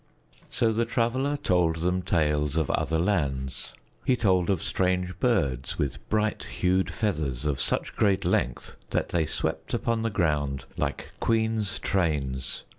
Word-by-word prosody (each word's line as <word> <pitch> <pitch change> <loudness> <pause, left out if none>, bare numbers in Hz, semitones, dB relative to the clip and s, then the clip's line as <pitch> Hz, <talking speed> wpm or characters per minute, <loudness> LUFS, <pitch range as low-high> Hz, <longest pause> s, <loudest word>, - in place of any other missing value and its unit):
So 115 -2 +1
the 115 +2 +1
Traveler 125 +5 0
told 90 -9 +2
them 90 +3 0
tales 75 -4 +1
of 80 -3 +1
other 80 - 0
lands. 70 -8 -1 0.3
He 130 - +3
told 95 -6 +2
of 95 -5 +1
strange 90 -1 0
birds 70 - +1
with 70 -2 -3
bright 110 0 +1
hued 95 +1 +1
feathers 75 - -1
of 70 -2 0
such - - -1
great 100 -3 +2
length - - 0
that - - 0
they 80 -3 +1
swept - - -2
upon 115 -1 0
the 115 - 0
ground 75 -8 0
like - - -3
queens' 110 -2 +1
trains. 70 -8 -1
90 Hz, 145 wpm, -27 LUFS, 75-110 Hz, 0.3 s, He